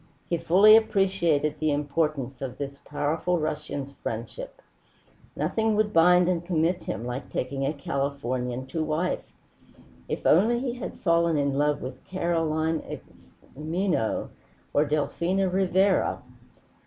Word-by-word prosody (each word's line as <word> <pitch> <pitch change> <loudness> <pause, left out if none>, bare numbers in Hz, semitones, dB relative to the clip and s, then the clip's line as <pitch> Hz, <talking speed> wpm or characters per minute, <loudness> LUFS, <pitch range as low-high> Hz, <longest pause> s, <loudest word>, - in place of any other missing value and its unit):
He 170 - +2
fully 190 +6 +7
appreciated 185 -8 +2
the 155 -1 +1
importance 145 -2 -1
of 130 -3 -5
this 140 -1 -6
powerful 160 +4 -1
Russian's 150 -3 -3
friendship. - - -6 0.8
Nothing 220 -1 0
would 210 0 +1
bind 180 +2 +5
and 175 -2 0
commit 175 +1 0
him 115 - -5
like 125 +3 -5
taking 135 +1 -2
a - - +1
Californian 130 -3 -3
to 160 +4 -3
wife. 155 +4 -1 0.9
If - - -4
only 220 +9 +4
he 250 -1 -2
had 245 - -7
fallen 170 -2 +3
in 140 -1 +1
love 145 +1 +1
with 130 0 -7
Carolina 165 -3 -1 0.6
Xime'no 160 - -1 0.4
or 145 - +3
Delfina 170 +5 0
Rivera! 190 +1 +2
160 Hz, 125 wpm, -26 LUFS, 140-180 Hz, 0.9 s, fully